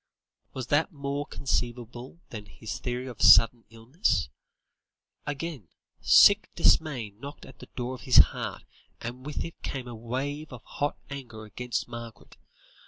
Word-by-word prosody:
Was 130 -2 -4
that 155 +6 +2
more 140 -1 -4
conceivable 120 +2 -3
than 105 -3 -8
his 110 +3 -7
theory 125 0 -3
of 125 -4 -8
sudden 115 0 +7
illness? 115 - -1 1.0
Again, 145 - -5 0.3
sick - - +7
dismay 130 -10 +2
knocked 140 +8 -10
at - - -15
the - - -12
door 125 0 -3
of 125 - -9
his 130 - +3 0.2
heart, - - -5 0.4
and 125 +3 -7
with 150 - -3
it 165 - -10
came 130 -2 -5
a 120 - -7
wave 135 +7 -4
of 125 -3 -10
hot 145 0 -3
anger 120 -6 -8
against 120 +3 -4
Margaret. 115 -2 -10
125 Hz, 145 wpm, -28 LUFS, 115-140 Hz, 1.0 s, sudden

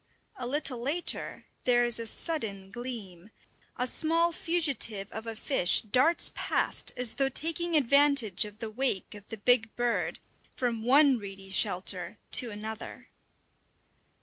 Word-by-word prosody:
A 250 - -5
little 275 -2 +1
later 300 +8 0 0.2
there 240 -1 +3
is 240 -1 +3
a 230 - -2
sudden 210 - -3
gleam. 210 -6 -8 0.5
A 250 - 0
small 330 +5 +1
fugitive 280 - -1
of 220 +1 -7
a 225 - -5
fish 215 - +3
darts 255 +10 +2
past - - -1
as 250 -2 +1
though 270 -1 0
taking 330 +4 -2
advantage 280 - +4
of 210 0 -9
the 225 -1 -6
wake 245 -4 -1
of 205 -1 -13
the 225 - -7
big 220 +1 +2
bird, 240 -1 -1 0.4
from 235 -3 -2
one 270 +2 +4
reedy 195 -1 -9
shelter 190 +1 +1
to 245 - +3
another. 215 +1 -8
240 Hz, 140 wpm, -28 LUFS, 210-280 Hz, 0.5 s, advantage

